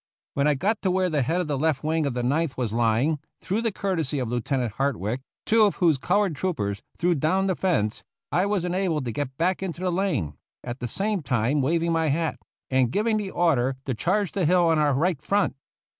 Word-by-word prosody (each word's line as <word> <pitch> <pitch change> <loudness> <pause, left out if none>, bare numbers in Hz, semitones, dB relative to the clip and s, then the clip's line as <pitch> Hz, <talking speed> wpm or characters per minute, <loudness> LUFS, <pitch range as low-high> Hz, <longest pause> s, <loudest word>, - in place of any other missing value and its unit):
When 140 +1 +1
I 150 - +3
got 200 +9 0
to 190 - +1
where 185 -1 +1
the 150 -2 +1
head 165 +8 +1
of 175 - -3
the 145 -3 -1
left 155 -2 +1
wing 155 -1 +1
of 130 - -3
the 125 - -1
Ninth 145 +3 0
was 120 -4 -2
lying, 120 +6 +2 0.2
through 205 +4 -1
the 230 -1 0
courtesy 170 -8 -1
of 125 -4 -2
Lieutenant 120 0 -1
Hart 135 +6 0
wick, 110 +7 -3 0.2
two 225 0 +4
of 210 -2 +4
whose 165 -7 +3
colored 195 +1 +1
troopers 105 - -2 0.2
threw 175 +1 +2
down 170 +6 +1
the 190 -2 +1
fence, 135 - 0 0.3
I 180 +3 +2
was 200 -4 0
enabled 180 -5 0
to 120 - -2
get 130 +1 -4
back 180 +3 +1
into 180 -2 -4
the 185 -1 0
lane, 170 - -1 0.3
at 120 +2 -6
the 125 - -3
same 200 - -1
time 125 +2 +1
waving 165 +5 +1
my 165 -1 +1
hat, 160 +2 0 0.3
and 130 -2 +3
giving 215 - +1
the 205 -2 -3
order 135 -8 +2
to 130 - -1
charge 190 - 0
the 190 -4 0
hill 175 0 +4
on 160 -1 +3
our 145 -3 +3
right 165 +1 +1
front. 200 -5 +1
160 Hz, 225 wpm, -25 LUFS, 130-185 Hz, 0.3 s, two